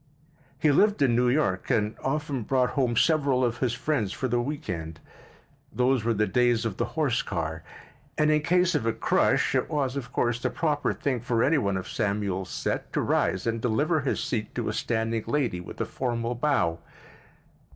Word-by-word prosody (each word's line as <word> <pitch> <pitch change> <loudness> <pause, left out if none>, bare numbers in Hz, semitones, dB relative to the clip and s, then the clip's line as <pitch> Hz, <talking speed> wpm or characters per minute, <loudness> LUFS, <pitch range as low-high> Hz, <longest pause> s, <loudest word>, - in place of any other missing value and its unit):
He 150 +2 +3
lived 205 +1 +3
in 120 -4 +3
New 125 +1 +3
York 120 -9 0
and 105 -1 +1
often 145 -1 -1
brought 125 +3 +1
home 125 -4 0
several 140 -5 +3
of 120 -1 -2
his 125 -3 0
friends 125 -6 -1
for 130 - -2
the 120 0 +1
week 145 +4 -5
end. 80 -3 -5 0.7
Those 125 -1 +1
were 115 0 +1
the 105 +1 +2
days 120 -1 +2
of 110 -4 -3
the - - 0
horse 135 -6 +2
car 80 -4 -4 0.6
and 150 0 +3
in 150 0 +3
case 180 +3 +2
of 115 - 0
a 115 - +2
crush - - +2
it - - 0
was, 140 -4 -1
of 125 -3 -5
course, 120 -1 0
the - - -1
proper 150 -3 0
thing 130 -4 -2
for 115 0 0
any 150 +1 +3
one 100 -4 0
of 95 - -5
Samuel's 100 -3 -2
set - - -3
to - - +1
rise 95 0 0
and 115 -1 -1
deliver 145 +8 +1
his 135 - -1
seat 110 -4 -3
to - - -2
a - - -2
standing 115 -1 -1
lady 125 -12 0
with - - -10
a - - 0
formal 120 -2 -2
bow. 120 - +1
120 Hz, 195 wpm, -26 LUFS, 110-140 Hz, 0.7 s, He